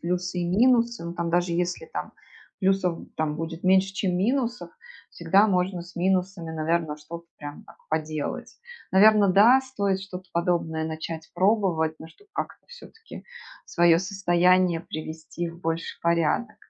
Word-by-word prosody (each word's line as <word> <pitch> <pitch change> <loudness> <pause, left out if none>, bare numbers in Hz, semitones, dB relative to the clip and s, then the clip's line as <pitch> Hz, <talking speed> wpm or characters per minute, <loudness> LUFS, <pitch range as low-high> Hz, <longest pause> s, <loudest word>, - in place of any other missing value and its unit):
плюсы 180 +1 -2
и 175 - -1
минусы. 235 +1 +3
Ну, 170 - -5
там 170 -1 -2
даже 175 0 +1
если 175 - -2
там 465 - -6 0.5
плюсов 190 -3 +1 0.2
там 155 -1 -1
будет 165 +1 -6
меньше, 190 +1 +3
чем 185 -3 -1
минусов, 240 +4 -1 0.4
всегда 190 +5 +3
можно 180 -2 0
с 175 +1 -14
минусами, 180 -1 -1
наверно, 160 -1 -1
что-то 170 +3 -10
прям 145 0 -8
так - - -17
поделать. 155 -1 -3 0.4
Наверно, 210 +1 +6
да, 215 +8 +6
стоит 200 -8 -2
что-то 185 -1 -8
подобное 170 -2 0
начать 160 0 -6
пробовать, 180 -4 +2
но 160 - -10
чтоб 410 - -22
как-то 405 - -6
всё-таки 475 -1 -13 0.4
свое 170 -1 +3
состояние 180 -2 +2
привести 160 +1 -6
в 170 +1 -12
больший 165 -1 -3
порядок. 170 +6 +1
180 Hz, 145 wpm, -25 LUFS, 165-195 Hz, 0.5 s, Наверно